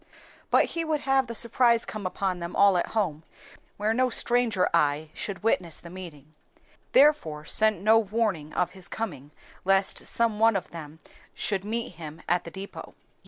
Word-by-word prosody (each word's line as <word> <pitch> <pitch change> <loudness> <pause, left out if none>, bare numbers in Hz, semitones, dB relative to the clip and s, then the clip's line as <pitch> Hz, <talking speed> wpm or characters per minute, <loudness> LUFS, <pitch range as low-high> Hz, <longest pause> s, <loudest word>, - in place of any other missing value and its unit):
But - - +4
he 335 - -1
would 310 -2 -1
have 270 -1 +2
the 235 - -5
surprise 235 0 +4
come 210 -3 -5
upon 185 -1 -2
them 170 0 -6
all 200 -2 +5
at 175 - 0
home, 165 -7 -1 0.5
where 210 +2 0
no 255 +2 +2
stranger 240 -5 +2
eye 150 -1 +1 0.2
would 200 -1 -7
witness 180 -7 0
the 170 - -12
meeting; 155 -5 -11 0.6
therefore 160 - +3
sent 215 +1 +2
no 220 +2 +6
warning 205 -8 -1
of 180 - 0
his 190 -1 -10
coming 145 -11 -5 0.3
lest 195 +1 +1
some 230 -2 0
one 225 -1 +4
of 190 - -3
them 155 -2 -9 0.4
should 195 -3 -1
meet 230 +3 -3
him 155 -1 -9
at 175 0 +1
the 170 - -8
depôt. 195 +2 -9
195 Hz, 170 wpm, -26 LUFS, 170-225 Hz, 0.6 s, no